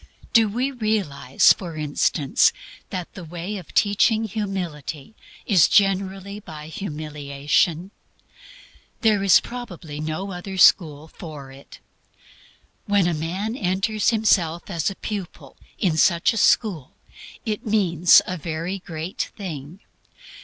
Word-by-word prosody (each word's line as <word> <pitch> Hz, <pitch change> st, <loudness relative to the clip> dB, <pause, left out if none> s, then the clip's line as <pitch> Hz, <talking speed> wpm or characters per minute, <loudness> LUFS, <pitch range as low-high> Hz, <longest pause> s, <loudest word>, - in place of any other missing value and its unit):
Do 225 Hz, -2 st, +5 dB
we 250 Hz, +6 st, -1 dB
realize, 210 Hz, -, +2 dB
for 170 Hz, -4 st, -8 dB
instance, 150 Hz, -1 st, +2 dB, 0.4 s
that 180 Hz, -2 st, -6 dB
the 185 Hz, -, -9 dB
way 175 Hz, +5 st, -6 dB
of 180 Hz, -, -11 dB
teaching 215 Hz, +2 st, +3 dB
humility 180 Hz, -7 st, -5 dB, 0.3 s
is 195 Hz, -8 st, +5 dB
generally 195 Hz, 0 st, +1 dB
by 155 Hz, -6 st, -10 dB
humiliation? 150 Hz, +1 st, -2 dB, 1.1 s
There 215 Hz, -4 st, +3 dB
is 195 Hz, -2 st, +6 dB
probably 180 Hz, -11 st, -8 dB
no 155 Hz, +6 st, -4 dB
other 190 Hz, +2 st, -7 dB
school 155 Hz, -5 st, +4 dB
for 150 Hz, -5 st, -10 dB
it. 135 Hz, +1 st, -14 dB, 1.1 s
When 205 Hz, -3 st, +3 dB
a 175 Hz, -, +1 dB
man 180 Hz, +8 st, -3 dB
enters 200 Hz, 0 st, 0 dB
himself 195 Hz, -7 st, +1 dB
as 170 Hz, 0 st, 0 dB
a 195 Hz, -, -7 dB
pupil 195 Hz, -4 st, -7 dB, 0.2 s
in 170 Hz, -5 st, 0 dB
such 170 Hz, -, +3 dB
a -, -, -4 dB
school 190 Hz, -, +1 dB, 0.5 s
it 220 Hz, +2 st, -3 dB
means 180 Hz, -5 st, +5 dB
a 185 Hz, -, -4 dB
very 165 Hz, +4 st, -4 dB
great 165 Hz, +1 st, -5 dB
thing. 170 Hz, -2 st, -7 dB
180 Hz, 120 wpm, -23 LUFS, 155-205 Hz, 1.1 s, is